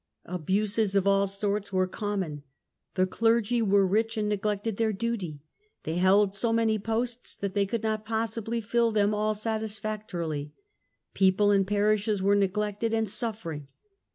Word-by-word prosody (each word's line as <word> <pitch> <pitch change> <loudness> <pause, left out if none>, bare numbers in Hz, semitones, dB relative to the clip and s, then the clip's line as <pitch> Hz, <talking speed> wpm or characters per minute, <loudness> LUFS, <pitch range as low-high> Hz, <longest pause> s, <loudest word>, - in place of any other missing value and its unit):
Abuses 200 +4 0
of 195 -1 +3
all 200 0 +3
sorts 200 +1 -2
were 185 -1 +2
common; 185 -6 -3 0.5
the 185 -1 +3
clergy 230 +3 +1
were 200 -2 +4
rich 220 +4 0
and 210 -1 0
neglected 210 +1 -1
their 225 -1 +1
duty, 195 -9 -3 0.4
they 160 +2 -3
held 195 +2 +4
so 225 +3 +1
many 225 -1 +2
posts 230 +3 -2
that 200 -1 -4
they 200 -1 +1
could 225 +2 -3
not 215 -1 -1
possibly 225 +1 -2
fill 230 +1 +1
them 210 -1 +2
all 215 +1 0
satisfactorily; 210 -8 -3 0.6
people 195 +2 +3
and 195 -1 +3
parishes 210 0 +1
were 200 +2 +3
neglected 210 +3 0
and 220 -3 0
suffering. 175 - -4
210 Hz, 150 wpm, -28 LUFS, 195-220 Hz, 0.6 s, were